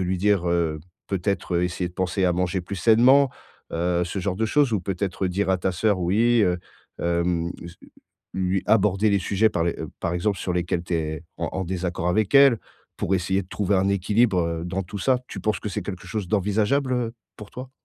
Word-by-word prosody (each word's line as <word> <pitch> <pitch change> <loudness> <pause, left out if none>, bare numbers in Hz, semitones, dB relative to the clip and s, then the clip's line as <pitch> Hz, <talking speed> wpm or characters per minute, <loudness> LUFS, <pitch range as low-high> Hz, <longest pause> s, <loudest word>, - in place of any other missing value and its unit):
lui 90 0 -1
dire, 100 -3 +2
heu, 85 -3 0 0.3
peut-être, 95 -2 -1
heu, 90 - +2
essayer 90 0 -2
de 90 - -17
penser 95 +1 0
à 90 - +3
manger 90 +1 -1
plus 95 +3 -6
sainement, 125 +7 +5 0.4
heu, 85 +1 0
ce 90 +3 -4
genre 95 0 -2
de 110 - 0
choses? 140 0 +2
Ou 100 - +1
peut-être 95 0 -2
dire 95 +2 -1
à 95 - +3
ta 95 +1 -1
sœur, 100 +2 +1
oui, 110 +7 +3
heu, 90 -2 +2 0.4
hem, 85 0 0
s 85 +1 -10 0.6
lui 95 0 0
aborder 105 -1 +3
les 100 - +3
sujets 100 +4 +2
par 85 -5 -1
les, 85 - 0
heu, - - -5
par 85 - -1
exemple 95 +3 0
sur 90 - -2
lesquels 85 -1 -1
tu 85 - -2
es 80 0 -3
en 85 - -2
en 95 - -2
désaccord 90 -1 -2
avec 105 +6 +1
elle, 140 -5 +7 0.4
pour 95 - 0
essayer 95 +1 0
de 90 - -16
trouver 100 -1 0
un 95 +1 +2
équilibre, 100 +1 +2
heu, 85 0 -3
dans 95 +2 -2
tout 100 +3 -7
ça? 130 +5 +2
Tu - - -7
penses 110 0 0
que 105 - -4
c'est 105 0 -3
quelque 95 -1 -7
chose 105 -5 -4
d'envisageable, 110 +7 +1
heu, 120 -2 -1 0.2
pour 105 - -11
toi? 130 +1 -8
95 Hz, 220 wpm, -24 LUFS, 90-105 Hz, 0.6 s, elle